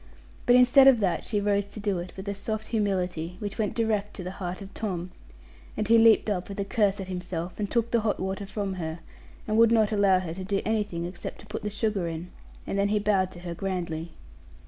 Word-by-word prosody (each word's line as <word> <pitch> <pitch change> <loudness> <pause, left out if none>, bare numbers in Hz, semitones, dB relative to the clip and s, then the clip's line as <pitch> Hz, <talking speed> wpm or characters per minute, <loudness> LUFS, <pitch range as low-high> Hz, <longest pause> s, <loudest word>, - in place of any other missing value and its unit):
But 245 - +7
instead 250 +2 +7
of 260 -4 +7
that 190 -5 0
she 210 - -1
rose 200 0 +1
to 205 +2 -9
do 200 -3 -1
it 175 +1 -6
with 190 +1 -7
a 200 - -1
soft 215 +2 -4
humility, 180 -6 -1
which 205 +2 -6
went 210 -3 0
direct 215 -3 0
to 185 - -6
the 180 - -4
heart 180 0 -3
of 195 -1 -10
Tom; 180 -4 -3 0.7
and 215 - -1
he 230 +1 +6
leaped 225 -1 +6
up 195 -3 -2
with 200 - -6
a 200 - 0
curse 205 -1 +1
at 190 - -5
himself, 180 -1 -5
and 205 -1 -1
took 235 -1 0
the 235 - +3
hot 215 -1 0
water 190 +1 -3
from 200 -1 -3
her, 160 0 -4 0.5
and 215 +1 +2
would 230 0 +6
not 220 -2 +4
allow 200 -3 +4
her 180 -3 -3
to 190 +2 -6
do 195 +1 0
anything 205 -6 -1
except 175 +1 -6
to - - -14
put 210 +2 -5
the 210 - -2
sugar 210 -4 -1
in; 165 +2 -6 0.3
and 195 - -2
then 200 - +3
he 210 +1 +1
bowed 200 -3 +2
to 175 - -11
her 175 -1 -5
grandly. 170 -3 -3
200 Hz, 235 wpm, -27 LUFS, 180-215 Hz, 0.7 s, But